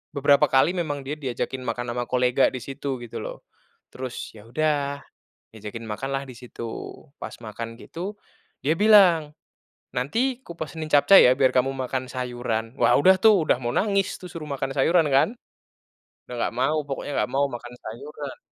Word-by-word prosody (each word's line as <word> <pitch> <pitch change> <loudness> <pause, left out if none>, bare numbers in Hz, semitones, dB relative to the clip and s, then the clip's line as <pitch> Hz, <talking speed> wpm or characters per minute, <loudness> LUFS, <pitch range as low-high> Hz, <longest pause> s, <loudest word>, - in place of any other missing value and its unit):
beberapa 140 +1 +5
kali 135 +5 +4
memang 145 -5 -2
dia 145 +3 -3
diajakin 130 -1 -3
makan 120 0 -3
ama 120 0 -1
kolega 125 +1 +3
di 130 - -4
situ, 135 -2 -5
gitu 120 - -7
loh. - - -7 0.5
Terus, 130 -1 -6
ya 105 - -14
udah, 140 0 0 0.5
diajakin 110 +1 -8
makanlah 135 +5 -3
di 125 - -10
situ, 120 -1 -8 0.5
pas - - -6
makan 115 +1 -7
gitu, 185 +5 -6 0.5
dia 150 - +3
bilang, 185 -8 +5 0.6
"Nanti 235 - 0
kupesenin 160 -2 -6
capcai 150 +7 +7
ya, - - +4
biar 130 -2 +4
kamu 130 +1 +3
makan 130 -1 -3
sayuran." 120 -2 -3
wah - - +5
udah 185 +6 +6
tuh, 205 -5 +5
udah - - +3
mau 120 - -1
nangis 200 -2 +1
tuh, 185 - -9
suruh 160 -4 -7
makan 135 0 -2
sayuran 165 +4 +4
kan. 135 - +5 1.0
Udah 125 - -5
nggak - - -1
mau 150 +5 +2
pokoknya, 140 +1 -4
nggak - - -4
mau 140 +1 +3
makan 120 0 -8
sayuran. 140 +5 -8
135 Hz, 165 wpm, -24 LUFS, 125-155 Hz, 1.0 s, capcai